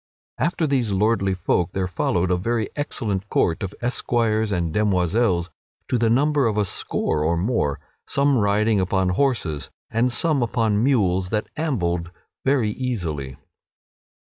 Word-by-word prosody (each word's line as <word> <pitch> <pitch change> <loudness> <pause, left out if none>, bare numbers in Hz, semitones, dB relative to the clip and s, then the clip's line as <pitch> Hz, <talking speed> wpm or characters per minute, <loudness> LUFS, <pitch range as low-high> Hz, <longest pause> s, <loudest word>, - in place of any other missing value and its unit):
After 170 0 +1
these 130 -7 0
lordly 100 -1 +1
folk 90 0 0
there 95 -1 -1
followed 90 0 0
a - - +4
very 110 +4 -1
excellent 105 -9 -3
court 80 - +1
of 95 -1 -4
esquires 115 -3 0
and 85 -4 -1
demoiselles 95 -2 +1 0.4
to 125 - +1
the 115 0 +2
number 140 +2 +3
of 105 -2 -1
a 105 - +2
score 75 -4 -1
or 85 +2 +1
more; 85 - 0 0.3
some 140 -2 +3
riding 105 +1 +2
upon 95 0 +1
horses 90 - 0 0.2
and 120 +3 +1
some 150 +2 +2
upon 110 -2 +1
mules 95 -9 +2
that 105 0 -2
ambled 90 - -1 0.3
very 130 -6 +2
easily. 85 - -4
105 Hz, 140 wpm, -23 LUFS, 90-120 Hz, 0.4 s, a